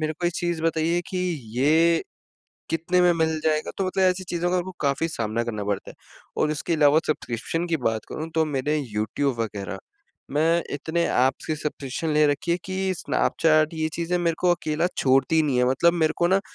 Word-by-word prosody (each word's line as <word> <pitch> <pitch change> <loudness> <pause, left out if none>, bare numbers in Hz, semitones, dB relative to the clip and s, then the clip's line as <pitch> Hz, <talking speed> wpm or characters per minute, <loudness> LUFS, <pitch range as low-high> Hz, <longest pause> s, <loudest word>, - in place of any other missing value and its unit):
मेरे 155 0 -1
को 175 +3 -3
ये 175 - +2
चीज़ 170 -2 -2
बताइए 165 +1 +1
कि 185 - -2 0.4
ये 160 +5 +4 0.7
कितने 165 +3 +1
में 175 -1 +5
मिल 160 -1 0
जाएगा 155 -1 +1
तो 195 - 0
मतलब 190 +1 0
ऐसी 185 0 +1
चीज़ों 175 0 -1
का 180 - +2
वो 185 - -6
काफ़ी 145 +3 0
सामना 115 -5 -2
करना 105 -3 -4
पड़ता 100 -1 -3
है। - - -13 0.5
और 155 - +2
उसके 155 +2 -2
अलावा 150 0 +5
सब्सक्रिप्शन 155 +4 -2
की 170 - 0
बात 110 -1 -3
करूँ 160 +1 -5
तो 160 -1 +3
मेरे 145 0 -1
यूट्यूब 120 +2 -2
वग़ैरह। 100 -4 -4 0.5
मैं 165 +4 +2
इतने 160 +4 -1
ऐप्स 130 +2 +1
के 155 - 0
सब्सक्रिप्शन 150 +1 -4
ले 150 0 +5
रखी 145 +4 -1
है - - +2
कि 190 0 -1
स्नैपचैट 155 -1 +1
ये 160 0 -1
चीज़ें 170 +1 -1
मेरे 170 -1 +1
को 180 - +3
अकेला 160 0 -1
छोड़ती 135 +4 +3
नहीं 140 -4 0
है। 125 - +4
मतलब 155 +7 +3
मेरे 160 -2 +1
को 175 - +3
ना, 190 +1 +3
160 Hz, 200 wpm, -24 LUFS, 140-170 Hz, 0.7 s, में